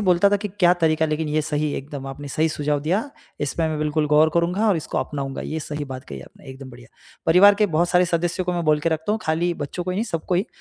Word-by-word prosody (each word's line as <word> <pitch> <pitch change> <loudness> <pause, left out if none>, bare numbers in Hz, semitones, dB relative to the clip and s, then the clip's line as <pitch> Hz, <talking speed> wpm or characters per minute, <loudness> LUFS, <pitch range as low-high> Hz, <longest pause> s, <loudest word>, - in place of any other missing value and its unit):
ही - - -2
बोलता 180 +2 +5
था 205 - +3
कि 205 +1 -5
क्या 180 -3 +3
तरीका 160 0 +3
लेकिन 155 0 -2
ये 155 +1 +1
सही 150 -1 -1
एकदम 140 -1 -6
आपने 140 +1 -7
सही 155 +3 +1
सुझाव 150 -1 -1
दिया, 190 - -1 0.3
इस 145 -2 -1
पे 165 -1 0
मैं 155 -1 -2
बिल्कुल 150 0 0
गौर 150 +2 +4
करूँगा 180 +6 +1
और 200 - +3
इसको 160 - -3
अपनाऊँगा, 140 -2 -4
ये 160 - -4
सही 150 0 -5
बात 130 -2 -8
कही 70 - -8
आपने - - -16
एकदम 130 0 -10
बढ़िया। 120 -1 -14 0.4
परिवार 190 +5 +7
के 210 +1 +2
बहुत 175 +2 +2
सारे 180 0 +4
सदस्यों 175 +1 -1
को 180 - -1
मैं 175 -1 -1
बोल 155 -1 +3
के 165 - +1
रखता 160 +5 -1
हूँ, 220 - 0
खाली 165 +3 0
बच्चों 160 +4 -5
को 185 - -2
ही - - -2
नहीं 215 - 0
सबको 180 -4 -3
ही 185 +5 +1
160 Hz, 270 wpm, -22 LUFS, 150-180 Hz, 0.4 s, परिवार